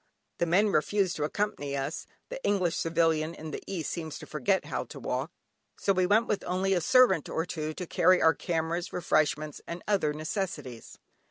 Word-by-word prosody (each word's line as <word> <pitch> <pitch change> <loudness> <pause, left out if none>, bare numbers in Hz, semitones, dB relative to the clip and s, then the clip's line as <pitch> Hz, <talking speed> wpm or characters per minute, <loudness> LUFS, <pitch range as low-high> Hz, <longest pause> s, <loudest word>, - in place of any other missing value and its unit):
The 170 - +1
men 200 +6 +4
refused 195 +2 +1
to 150 - 0
accompany 150 -6 -2
us 140 +4 -4 0.2
(the - - -7
English 185 -5 +1
civilian 165 -1 +1
in 155 0 -7
the - - -5
East 170 -6 -3
seems 160 -3 -5
to - - -9
forget 190 +5 0
how - - -3
to - - -10
walk) - - -2 0.5
so 195 - +2
we 185 -1 +2
went 215 +4 +4
with 210 - -1
only 185 +2 +1
a 180 - +1
servant 255 - +4
or 165 - -1
two 155 -3 -4
to 180 - -5
carry 180 +2 +4
our 160 - +5
cameras, 165 +2 -2
refreshments, 155 -2 0
and 170 +1 -6
other 195 -8 +2
necessities. 155 - -5
170 Hz, 185 wpm, -29 LUFS, 155-195 Hz, 0.5 s, our